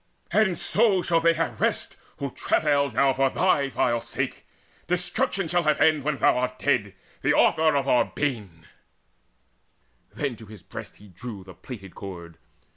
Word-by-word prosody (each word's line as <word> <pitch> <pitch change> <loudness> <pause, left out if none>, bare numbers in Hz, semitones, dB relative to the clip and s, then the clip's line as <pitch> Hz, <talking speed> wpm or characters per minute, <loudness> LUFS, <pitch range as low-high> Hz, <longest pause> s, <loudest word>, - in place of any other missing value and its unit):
And 190 -5 +2
so 205 -5 +2
shall 165 -1 +2
they 165 0 +3
have 140 -9 -3
rest, - - 0 0.2
who 140 -2 -4
travail 140 0 +1
now 135 +3 +2
For 135 +1 +2
thy 140 +1 +1
vile 120 -3 0
sake. - - -4 0.4
Destruction 180 - 0
shall 175 +2 +2
have 155 -2 +1
end 155 -3 +3
When 150 0 -1
thou 125 - +3
art 125 0 -2
dead, 105 -10 0 0.3
the - - +2
author 160 -1 +3
of 140 -1 0
our 125 - +4
bane." 105 - -4 1.5
Then 140 -4 -3
to 110 - -13
his 105 -4 -13
breast - - -9
he 105 0 -16
drew 100 +2 -8
the 95 -1 -12
plaited 95 0 -10
cord. 85 -4 -9
135 Hz, 165 wpm, -25 LUFS, 110-160 Hz, 1.5 s, our